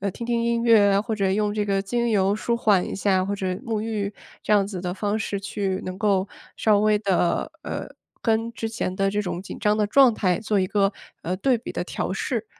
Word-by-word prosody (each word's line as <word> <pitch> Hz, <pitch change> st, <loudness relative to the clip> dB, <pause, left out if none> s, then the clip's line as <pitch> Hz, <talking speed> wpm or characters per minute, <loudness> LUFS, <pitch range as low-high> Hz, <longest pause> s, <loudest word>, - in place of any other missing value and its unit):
呃， 200 Hz, 0 st, -1 dB
听 235 Hz, +5 st, -7 dB
听 235 Hz, -1 st, 0 dB
音 235 Hz, 0 st, +1 dB
乐 215 Hz, -4 st, +6 dB
啊， 200 Hz, -, +3 dB
或 220 Hz, -1 st, -2 dB
者 195 Hz, -2 st, 0 dB
用 210 Hz, +1 st, 0 dB
这 210 Hz, -1 st, 0 dB
个 195 Hz, -1 st, +1 dB
精 235 Hz, +4 st, -1 dB
油 200 Hz, -1 st, +2 dB
舒 235 Hz, +2 st, -1 dB
缓 205 Hz, -6 st, +3 dB
一 -, -, -5 dB
下， 190 Hz, -2 st, +2 dB
或 200 Hz, -, -2 dB
者 190 Hz, -, -3 dB, 0.2 s
沐 220 Hz, -3 st, -1 dB
浴 210 Hz, -2 st, -2 dB, 0.3 s
这 -, -, 0 dB
样 200 Hz, -2 st, +4 dB
子 190 Hz, -3 st, -5 dB
的 180 Hz, -1 st, -3 dB
方 205 Hz, +2 st, -1 dB
式 205 Hz, -2 st, -2 dB
去 195 Hz, -1 st, -3 dB
能 185 Hz, 0 st, -5 dB
够 200 Hz, -2 st, +1 dB, 0.3 s
稍 210 Hz, -2 st, +3 dB
微 210 Hz, 0 st, +3 dB
地 190 Hz, -4 st, +1 dB
呃， -, -, -5 dB, 0.4 s
跟 225 Hz, 0 st, +1 dB
之 225 Hz, 0 st, -4 dB
前 195 Hz, -4 st, -3 dB
的 195 Hz, 0 st, +1 dB
这 210 Hz, +1 st, -1 dB
种 180 Hz, -2 st, -4 dB
紧 -, -, -8 dB
张 210 Hz, 0 st, +2 dB
的 210 Hz, -1 st, +2 dB
状 260 Hz, +2 st, +6 dB
态 180 Hz, -4 st, +1 dB
做 210 Hz, -2 st, 0 dB
一 185 Hz, -, +1 dB
个， 200 Hz, 0 st, +1 dB, 0.3 s
呃， 180 Hz, +2 st, -2 dB
对 250 Hz, +5 st, +2 dB
比 -, -, -7 dB
的 -, -, -2 dB
调 -, -, -3 dB
试。 -, -, -2 dB
205 Hz, 255 characters per minute, -24 LUFS, 195-220 Hz, 0.4 s, 乐